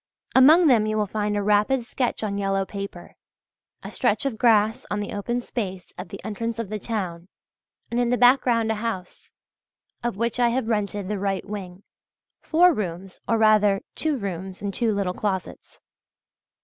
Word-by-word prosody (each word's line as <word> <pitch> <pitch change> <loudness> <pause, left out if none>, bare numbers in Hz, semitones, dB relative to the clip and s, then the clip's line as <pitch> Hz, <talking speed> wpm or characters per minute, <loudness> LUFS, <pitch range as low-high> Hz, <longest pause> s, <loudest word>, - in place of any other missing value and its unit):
Among 305 +7 +7
them 230 -7 +4
you 215 0 -1
will 210 - +1
find 210 +1 -2
a 205 - -1
rapid 210 +5 +2
sketch 245 0 -2
on 200 -1 -2
yellow 195 -1 0
paper; 200 -3 -8 0.7
a - - -7
stretch - - 0
of 240 -6 -2
grass 220 -2 +3
on 205 - -1
the 205 - -4
open 235 +4 -2
space 190 -7 -5
at 180 - -8
the 195 - -8
entrance 230 +2 -3
of 230 -4 -4
the 215 0 -4
town, 185 -6 -4 0.6
and 235 - 0
in 240 -1 +1
the 250 - +2
background 245 -3 +4
a 215 -1 -3
house, 190 -6 -5 0.7
of 240 -5 -2
which 235 +2 -1
I 240 -1 +4
have 245 -1 -1
rented 205 -3 -1
the 205 0 -2
right 195 -1 -2
wing 195 -2 -7 0.6
(four 350 +2 +4
rooms, 185 - -5
or 230 - +2
rather 215 -2 +4
two 310 -3 -1
rooms 190 -3 -5
and 200 -1 -4
two 230 +1 +1
little 195 -3 -1
closets). 190 -2 -5
210 Hz, 175 wpm, -24 LUFS, 195-235 Hz, 0.7 s, Among